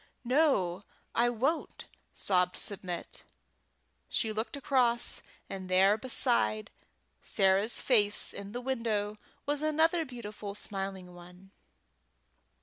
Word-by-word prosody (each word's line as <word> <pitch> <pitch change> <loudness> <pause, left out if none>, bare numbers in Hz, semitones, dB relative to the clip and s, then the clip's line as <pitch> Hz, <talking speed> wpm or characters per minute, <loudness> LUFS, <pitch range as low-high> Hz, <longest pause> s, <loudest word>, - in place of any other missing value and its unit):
"No, 235 - +2 0.3
I 240 +1 +3
won't," 265 +8 -2 0.3
sobbed 180 -2 +1
Submit. 180 -4 -2 0.9
She 220 - 0
looked 220 +5 -3
across, 245 -3 +2 0.3
and 190 -1 -7
there 190 +2 +5
beside 220 - +1 0.5
Sarah's 195 +4 +3
face 210 -5 +3
in 200 0 -7
the 245 +3 -5
window 220 -5 -2 0.3
was 290 0 -1
another 320 +2 +2
beautiful 210 -6 -7
smiling 195 -3 -5
one. 180 +2 -15
210 Hz, 100 wpm, -31 LUFS, 190-250 Hz, 0.9 s, there